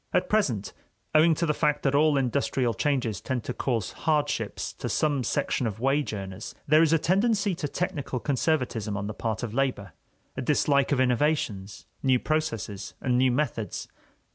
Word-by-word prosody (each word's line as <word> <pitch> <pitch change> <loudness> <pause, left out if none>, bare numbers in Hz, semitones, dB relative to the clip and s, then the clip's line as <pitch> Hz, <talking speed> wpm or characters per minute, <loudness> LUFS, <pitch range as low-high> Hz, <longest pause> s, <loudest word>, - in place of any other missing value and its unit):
At - - +1
present, 135 - 0 0.4
owing 160 +1 +5
to 170 - 0
the 155 - +1
fact 150 -1 0
that 135 - +2
all 150 0 +4
industrial 130 -2 0
changes 125 -9 -1
tend 130 -4 -2
to 125 - -4
cause 115 -7 -1
hardships 145 -9 -1
to - - -3
some 145 -4 +1
section 135 -2 0
of 105 -1 -5
wage 135 +4 +1
earners, 95 -1 -6
there 155 +2 +5
is 165 -2 +4
a 165 - +5
tendency 200 +4 +2
to 165 -3 -3
technical 145 -5 -3
conservatism 125 -7 -1
on 100 - -3
the 105 - -4
part 110 +1 -3
of 115 -3 -4
labor, 125 - -1 0.4
a 130 - -3
dislike 140 +1 +2
of 140 - +2
innovations, 125 -6 0 0.2
new 130 -2 +4
processes, 115 -11 -3
and 125 -1 0
new 130 +1 +4
methods. 120 -5 -2
135 Hz, 170 wpm, -27 LUFS, 115-150 Hz, 0.4 s, owing